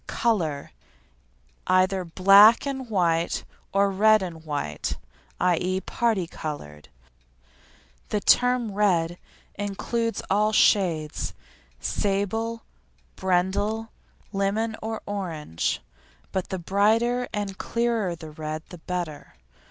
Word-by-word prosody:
COLOUR 165 -12 -1 1.0
Either 185 +1 +3
black 195 - +6
and 265 -3 -4
white 170 -5 +1 0.3
or 200 0 +3
red 215 +1 +4
and 165 -3 -7
white, 145 - -3 0.4
i.e., 180 +1 +1
parti 220 -6 0
coloured. 75 - -7 1.2
The 210 - 0
term 245 +1 +3
red 180 -4 +1 0.3
includes 210 +3 -2
all 210 +2 +2
shades, 170 -9 +2 0.4
sable, 215 - -1 0.5
brindle, 195 +5 0 0.4
lemon 205 +3 0
or 220 0 -4
orange, 165 - -3 0.5
but 190 - -2
the 190 - -2
brighter 225 +7 +2
and 200 -2 -4
clearer 230 -6 0
the 160 -2 -10
red 155 0 -5
the 175 - -10
better. 170 -3 -5
195 Hz, 95 wpm, -25 LUFS, 170-220 Hz, 1.2 s, black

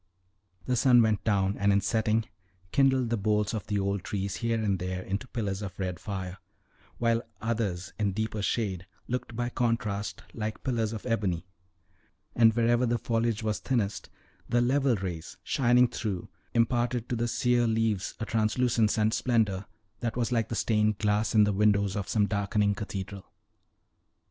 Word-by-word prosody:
The 125 - +1
sun 120 0 +6
went 110 -2 +1
down, 100 -2 +1
and 100 0 +3
in 100 - +4
setting, 110 +1 +1 0.5
kindled 130 -3 +3
the 115 - +2
boles 105 +1 +1
of 105 -2 -4
the 105 - 0
old 100 -1 -1
trees 100 -1 -3
here 115 -1 0
and 100 -4 0
there 90 +1 -3
into 100 +7 -3
pillars 105 -5 -3
of 100 -2 -6
red 90 -3 -3
fire, 95 -2 -5 0.6
while 115 -1 +2 0.2
others 105 -6 -2
in 100 -2 +1
deeper 110 +1 -2
shade 95 -4 -1 0.2
looked 125 -1 -3
by 120 +1 -1
contrast 115 -4 -1
like 110 -1 -4
pillars 115 -5 0
of 110 -2 -6
ebony; 100 -8 -1 0.9
and 115 -1 +6
wherever 120 +1 +3
the 120 +1 +1
foliage 115 -1 0
was 110 -1 -1
thinnest, 110 -6 -1 0.4
the 120 - +3
level 130 +1 +3
rays 90 -5 -5
shining 125 -1 +4
through 105 -6 -4 0.3
imparted 120 +1 +1
to 120 - -1
the 120 +1 0
sere 120 0 +2
leaves 110 -4 0
a 110 - -2
translucence 110 0 +1
and 110 0 +2
splendor 110 -7 +1 0.3
that 120 -1 -3
was 120 0 0
like 115 -3 +1
the 115 - -2
stained 105 -2 +2
glass 105 +1 +1
in 105 - +7
the 105 0 +2
windows 100 -1 +2
of 100 -2 -3
some 105 -2 +3
darkening 100 0 +1
cathedral. 100 -1 -6
110 Hz, 165 wpm, -28 LUFS, 100-120 Hz, 0.9 s, in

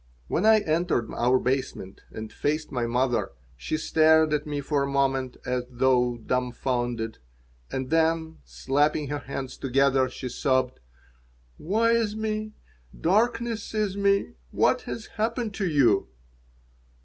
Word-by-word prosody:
When 185 - +1
I 220 -1 +6
entered 160 - 0
our 125 +2 +3
basement 130 -7 -3
and 110 0 -8
faced 155 +2 -2
my 120 -3 -1
mother, 125 +1 0 0.2
she 65 - -3
stared 160 0 +4
at 150 +1 -1
me 145 -1 -2
for 145 0 0
a 140 - 0
moment, 135 -2 0
as 125 0 -1
though 125 -1 +2
dumfounded, 120 -1 -2 0.5
and 130 +1 -4
then, 160 0 +1
slapping 145 +1 0
her 145 0 -2
hands 135 -2 -6
together, 135 0 +2
she 130 0 -6
sobbed: 130 0 0 0.8
"Woe 205 +8 0
is 230 -2 +2
me! 215 0 -3 0.5
Darkness 225 +4 0
is 210 -3 0
me! 200 - +1 0.2
What - - +2
has 225 - -5
happened 225 0 -1
to 195 -2 -1
you?" 130 - +3
140 Hz, 135 wpm, -26 LUFS, 125-185 Hz, 0.8 s, I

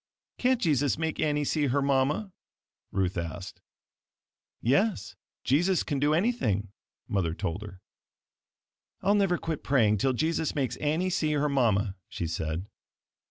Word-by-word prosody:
"Can't 255 -1 +3
Jesus 145 - +2
make 160 -1 -2
Annie 150 -1 +1
see 145 0 +1
her 135 +2 +1
mama?" 140 +8 +1 0.6
Ruth 95 -2 0
asked. 85 +3 -6 1.0
"Yes, 185 - +1 0.3
Jesus 175 +8 +2
can 145 -3 -2
do 145 +2 +3
anything," 125 - 0 0.4
Mother 85 -5 0
told 85 +2 -3
her. 100 -3 -10 1.2
"I'll 200 +2 +4
never 195 -4 +3
quit 160 -3 -4
praying 110 -7 +3
till 130 +4 +2
Jesus 160 +3 0
makes 135 -4 -1
Annie 160 +5 0
see 155 -4 +1
her 150 0 +1
Mama," 110 -8 +2 0.2
she - - -4
said. 80 +2 -3
140 Hz, 135 wpm, -28 LUFS, 105-160 Hz, 1.2 s, I'll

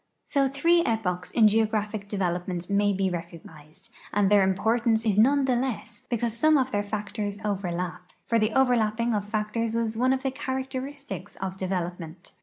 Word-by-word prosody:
So 275 -1 +2
three 335 +5 +3
epochs 180 - -1
in 225 -3 +5
geographic 215 -1 0
development 180 -2 -2
may 205 0 +3
be 190 -1 0
recognized, 165 -3 -9 0.2
and 205 -1 +2
their 205 -1 +6
importance 225 +4 +2
is 210 -3 +2
none 270 +6 +4
the 255 -2 +2
less 235 -4 -4
because 235 -1 -1
some 310 +5 +4
of 260 -1 0
their 205 - +1
fac 205 0 -4
tors 205 -2 -3
overlap— 180 -2 -3
for 230 - +2
the 215 +1 +1
overlapping 235 -3 +2
of 205 -1 -1
factors 215 +2 -1
is 230 -1 -1
one 255 +3 +2
of 265 0 0
the 270 - 0
charac 265 0 -4
teristics 270 -6 -6
of 190 -1 -4
development. 175 -2 -4
215 Hz, 175 wpm, -26 LUFS, 190-240 Hz, 0.2 s, their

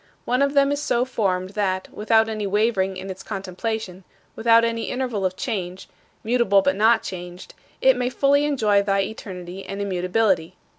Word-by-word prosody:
One 250 +2 +1
of 280 +1 +1
them 280 0 +4
is 285 0 -1
so 245 -3 +1
formed 190 -7 -1
that, 190 -2 -1
without 220 +1 +2
any 215 -2 -3
wavering 195 -2 +1
in 190 +1 -6
its 190 0 -9
contemplation, 195 0 -5 0.3
without 230 0 +4
any 230 0 -2
interval 245 -7 -1
of 185 - -8
change 190 -7 -4 0.4
mutable 220 -4 +3
but 185 0 +2
not 220 +3 +4
changed 180 -1 -8 0.3
it - - +5
may 250 - -1
fully 285 +2 +2
enjoy 215 -9 +2
thy 200 0 +1
eternity 185 -3 -7
and 195 +1 -6
immutability. 185 -2 0
205 Hz, 165 wpm, -23 LUFS, 190-235 Hz, 0.4 s, it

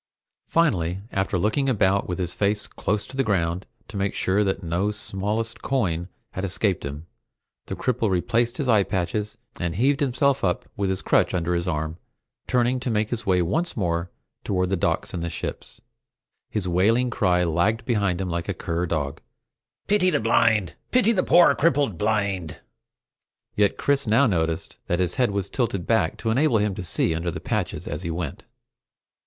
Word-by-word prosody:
Finally, 95 - +1
after 95 -1 0
looking 110 +9 +1
about 100 -5 +2
with 90 - -2
his 90 -2 -2
face 105 +2 0
close 100 +1 -2
to 130 - -11
the 135 - +2
ground 90 -4 0 0.2
to 110 - -11
make 100 0 -1
sure 100 +3 +2
that 95 -1 -1
no 85 +5 0
smallest 105 +2 -2
coin 90 -10 -1 0.2
had 95 - -5
escaped 100 0 0
him, 70 +3 -6 0.6
the - - -4
cripple 120 -3 0
replaced 115 +6 +1
his 145 -4 -2
eye 110 -4 +5
patches 100 +4 -2 0.2
and 85 -2 -2
heaved 135 +7 +2
himself 140 0 +1
up 90 -2 0
with 100 -2 -1
his 95 -1 -2
crutch - - +2
under 90 0 0
his 85 +1 -1
arm, 80 0 -2 0.5
turning 125 0 +2
to 125 - -3
make 105 -1 0
his 120 -3 -3
way 90 -2 +3
once 140 - -1
more 85 -3 -1 0.3
toward 90 -1 0
the - - +3
docks 85 - -1
and 85 - -3
the 85 - -2
ships. 80 - -6 0.7
His 100 -4 -2
wailing 110 +8 +2
cry 90 -5 +2
lagged 90 +7 +1
behind 100 -7 +1
him 95 - -2
like 85 +1 -3
a 100 - -1
cur 85 +1 -2
dog: 75 -3 -2 0.6
"Pity 200 -2 +3
the 150 - +2
blind! 110 -3 +3 0.2
Pity 245 -3 +4
the 195 -5 +2
pore 175 -1 +6
crippled 140 - +1
blind!" 100 -6 -1 1.0
Yet 100 -1 +2
Chris 140 -2 +1
now 115 +6 +5
noticed 80 -7 -1
that 85 - +1
his 90 -1 0
head 125 - +4
was 100 -1 -2
tilted 100 -7 -2
back 115 -1 +1
to 110 - -1
enable 130 0 +3
him 105 -1 +1
to 95 - -5
see 85 - 0
under 85 +2 -2
the 90 +2 -4
patches 105 -6 -3
as 75 - -4
he 85 - -4
went. 80 -3 -4
100 Hz, 180 wpm, -24 LUFS, 90-115 Hz, 1.0 s, pore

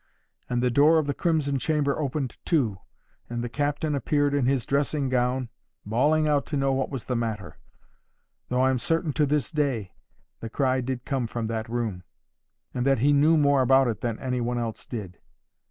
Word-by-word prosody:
And 120 0 0
the 125 - +2
door 150 +6 +5
of 155 - +2
the 145 - -1
crimson 145 -4 0
chamber 150 -1 0
opened 140 -3 -3
too, 120 - +1 0.5
and 120 0 -3
the 120 - -3
captain 145 +3 -1
appeared 145 +2 +1
in 140 -3 +2
his 130 -3 +1
dressing 140 0 0
gown, 125 0 0 0.4
bawling 150 +9 +2
out 145 -2 +1
to 150 - -2
know 135 0 +1
what 135 0 -1
was 135 -5 -5
the 125 - -2
matter; 110 -8 -4 0.9
though 125 +1 +2
I'm 130 -1 +2
certain, 165 +3 0
to 150 0 +2
this 150 +1 0
day, 135 - -1 0.5
the 115 - -6
cry 130 +1 +1
did 125 -1 -4
come 130 -4 -1
from 115 0 -4
that 110 0 -3
room, 115 -6 -2 0.7
and 125 - -1
that 135 0 +3
he 140 +5 +3
knew 155 +3 +5
more 140 -2 +4
about 130 +1 +4
it 115 - -3
than 115 -2 -2
any 125 -1 -2
one 120 +1 -1
else 115 -2 -4
did. 100 -7 -7
130 Hz, 190 wpm, -26 LUFS, 120-145 Hz, 0.9 s, door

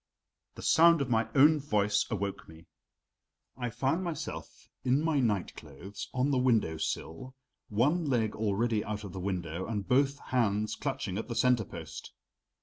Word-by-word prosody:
The - - -9
sound 170 +1 +6
of 130 - -6
my 110 -1 +2
own 150 +3 +6
voice 105 -7 +1
awoke 100 -5 -4
me. 80 +1 -14 0.9
I 125 -2 -3
found 135 - -1
myself 160 -4 -6 0.2
in 130 +2 +3
my 160 -3 +2
night 105 -7 0
clothes 95 +8 -9
on 130 +2 0
the 130 - +2
window 115 -10 +2
sill, 80 +11 -4 0.3
one 145 +11 +2
leg 120 -6 0
already 110 +1 0
out 105 0 -5
of 100 -4 -8
the 95 - -5
window 90 -2 -3
and 105 -3 -3
both 140 +2 +2 0.2
hands 110 -3 +1
clutching 135 -8 -3
at - - -5
the 120 - -4
center 125 -4 +3
post. - - -9
115 Hz, 160 wpm, -30 LUFS, 100-135 Hz, 0.9 s, sound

